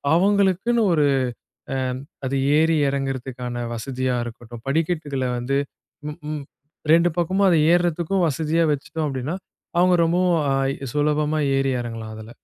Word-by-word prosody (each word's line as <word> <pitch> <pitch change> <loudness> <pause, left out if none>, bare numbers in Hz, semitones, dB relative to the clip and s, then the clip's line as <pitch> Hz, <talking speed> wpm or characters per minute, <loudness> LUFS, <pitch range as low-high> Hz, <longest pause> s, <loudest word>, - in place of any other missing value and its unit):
அவங்களுக்குன்னு 200 +4 +3
ஒரு 150 -2 +3 0.7
அ - - -1 0.5
அது 135 +1 -1 0.2
ஏறி 160 0 +3
இறங்குறதுக்கான 130 -3 -3
வசதியா 130 +1 -2
இருக்கட்டும், 120 0 -10
படிக்கட்டுகள்ல 150 -4 -1
வந்து 135 +3 0 0.5
ம் 150 - -7
ம் 150 -2 -4 0.5
2 170 +1 +5
பக்கமும் 190 +3 +2
அத 170 - +4 0.2
ஏறுறதுக்கும் 175 +1 +1
வசதியா 160 +2 +1
வச்சுட்டோம் 150 +2 -3
அப்படின்னா, 135 +6 -3 0.4
அவங்க 180 0 +5
ரொம்பவும் 175 +1 +2
அ 135 - +1 0.4
சுலபமா 150 +1 +1 0.2
ஏறி 135 -1 +1
இறங்கலாம் 115 -2 -6
அதுல. 110 +1 -10
150 Hz, 125 wpm, -23 LUFS, 130-175 Hz, 0.7 s, 2